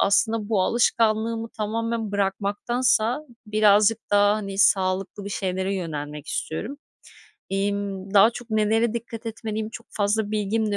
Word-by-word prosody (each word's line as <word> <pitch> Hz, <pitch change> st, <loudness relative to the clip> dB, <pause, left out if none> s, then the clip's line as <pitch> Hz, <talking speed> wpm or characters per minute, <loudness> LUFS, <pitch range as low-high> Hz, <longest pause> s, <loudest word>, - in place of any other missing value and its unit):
aslında 215 Hz, +1 st, +2 dB
bu 210 Hz, -4 st, +2 dB
alışkanlığımı 225 Hz, +1 st, +1 dB
tamamen 225 Hz, 0 st, -3 dB
bırakmaktansa 215 Hz, +5 st, 0 dB, 0.3 s
birazcık 210 Hz, +1 st, +4 dB
daha, 205 Hz, 0 st, +4 dB
hani, 195 Hz, -2 st, -5 dB
sağlıklı 190 Hz, 0 st, +2 dB
bir -, -, -5 dB
şeylere 190 Hz, 0 st, -2 dB
yönelmek 150 Hz, -5 st, -5 dB
istiyorum. 225 Hz, -, -4 dB, 0.7 s
İmm, 195 Hz, 0 st, -2 dB
daha 205 Hz, +3 st, +7 dB
çok 240 Hz, 0 st, -10 dB
nelere 220 Hz, +1 st, +2 dB
dikkat 230 Hz, 0 st, -6 dB
etmeliyim 220 Hz, -1 st, -4 dB
çok 230 Hz, +1 st, -10 dB
fazla 210 Hz, +1 st, 0 dB
bilgim 215 Hz, +1 st, 0 dB
de -, -, +1 dB
210 Hz, 130 wpm, -24 LUFS, 195-225 Hz, 0.7 s, daha